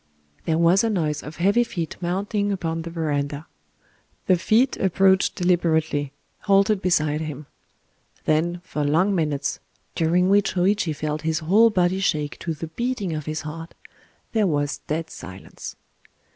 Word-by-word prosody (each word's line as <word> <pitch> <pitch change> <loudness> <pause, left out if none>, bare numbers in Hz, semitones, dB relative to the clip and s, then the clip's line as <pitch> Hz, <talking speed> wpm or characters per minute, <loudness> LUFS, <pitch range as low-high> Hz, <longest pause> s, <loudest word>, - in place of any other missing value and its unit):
There 160 -1 +1
was 170 +4 +4
a 230 - +1
noise 160 -8 -1
of 150 - -9
heavy 200 +7 +3
feet 170 -8 -4
mounting 200 +4 -1
upon 165 -4 -2
the 170 - -6
verandah. 145 -2 -2 0.8
The 185 - +4
feet 225 +9 +2
approached 190 0 +3
deliberately,—halted 175 +4 +1
beside 155 -4 +1
him. 150 -2 -6 0.8
Then, 170 +3 +1
for 150 -4 -3
long 165 +8 +2
minutes,—during 165 +2 -1
which 200 0 +3
Hōïchi 180 -3 +1
felt 150 +1 -3
his 160 0 0
whole 195 +8 +4
body 185 -2 +1
shake 150 -6 -1
to 165 -2 -3
the 160 - -5
beating 210 0 -3
of 155 -1 -5
his 155 0 -3
heart,—there 165 +6 -5
was 145 -3 -1
dead 160 +2 -3
silence. 95 +1 -9
170 Hz, 135 wpm, -23 LUFS, 155-195 Hz, 0.8 s, was